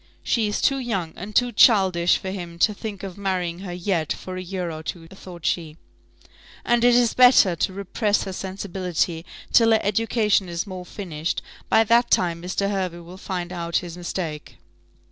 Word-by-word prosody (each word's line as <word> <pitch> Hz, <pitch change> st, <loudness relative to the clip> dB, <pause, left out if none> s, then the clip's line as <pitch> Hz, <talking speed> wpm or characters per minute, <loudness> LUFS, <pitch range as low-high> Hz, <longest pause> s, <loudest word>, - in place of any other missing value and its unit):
"She 225 Hz, -3 st, +1 dB
is 210 Hz, -, -2 dB
too 275 Hz, -1 st, +3 dB
young 195 Hz, -10 st, -3 dB
and 200 Hz, +3 st, -8 dB
too 245 Hz, -1 st, +3 dB
childish 190 Hz, -8 st, +4 dB
for 190 Hz, -, -5 dB
him 175 Hz, -3 st, -7 dB
to 210 Hz, +5 st, +3 dB
think 205 Hz, -2 st, -7 dB
of 195 Hz, 0 st, -7 dB
marrying 180 Hz, -3 st, -2 dB
her 190 Hz, -2 st, -7 dB
yet, 175 Hz, -3 st, -1 dB
for 185 Hz, -, -5 dB
a 185 Hz, -, -4 dB
year 180 Hz, -1 st, -4 dB
or 155 Hz, 0 st, -7 dB
two," 165 Hz, +1 st, -6 dB
thought 180 Hz, -4 st, -11 dB
she; 160 Hz, -3 st, -1 dB, 0.9 s
"and 240 Hz, 0 st, +2 dB
it 245 Hz, 0 st, +6 dB
is 240 Hz, -2 st, +3 dB
better 245 Hz, -8 st, +6 dB
to 190 Hz, -, 0 dB
repress 200 Hz, +2 st, -1 dB
her 190 Hz, -, -5 dB
sensibility 185 Hz, -3 st, -3 dB, 0.3 s
till 230 Hz, -1 st, +6 dB
her 220 Hz, -, +4 dB
education 210 Hz, -2 st, +1 dB
is 170 Hz, +2 st, -3 dB
more 185 Hz, -3 st, -8 dB
finished; 170 Hz, -5 st, -4 dB, 0.3 s
by 220 Hz, -, +5 dB
that 235 Hz, +2 st, +3 dB
time 170 Hz, -2 st, +1 dB
Mr. 200 Hz, +3 st, -1 dB
Hervey 185 Hz, -3 st, -3 dB
will 175 Hz, +2 st, -11 dB
find 185 Hz, -2 st, -5 dB
out 170 Hz, -1 st, -4 dB
his 170 Hz, -1 st, -8 dB
mistake." 170 Hz, -3 st, -5 dB
185 Hz, 185 wpm, -23 LUFS, 175-210 Hz, 0.9 s, it